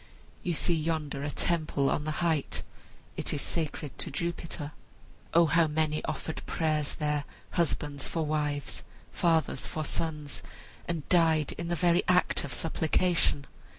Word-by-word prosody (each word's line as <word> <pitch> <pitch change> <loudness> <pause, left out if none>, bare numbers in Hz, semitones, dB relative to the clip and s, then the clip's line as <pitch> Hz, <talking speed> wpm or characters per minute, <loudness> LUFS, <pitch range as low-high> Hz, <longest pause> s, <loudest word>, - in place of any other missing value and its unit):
You 175 - 0
see 170 +2 +2
yonder 155 -3 -1
a 145 - -2
temple 155 -3 +1
on 150 - 0
the 155 +3 -1
height. 160 -4 0 0.5
It - - +2
is 145 - -1
sacred 150 -6 -2
to - - -1
Jupiter. 165 -1 -3 0.6
O 170 0 +6
how 165 +1 +4
many 155 0 0
offered 160 - -3
prayers 155 -3 0
there, 150 -1 0 0.3
husbands 150 -4 0
for 165 -2 -1
wives, 150 -2 -1 0.3
fathers 160 -5 +2
for 155 -1 -3
sons, 150 -6 -2 0.5
and 165 -4 -3
died 160 -4 +4
in 170 - -5
the 175 - 0
very 175 +1 +4
act 180 0 +3
of 140 - -5
supplication! 160 0 +1
155 Hz, 145 wpm, -30 LUFS, 150-170 Hz, 0.6 s, O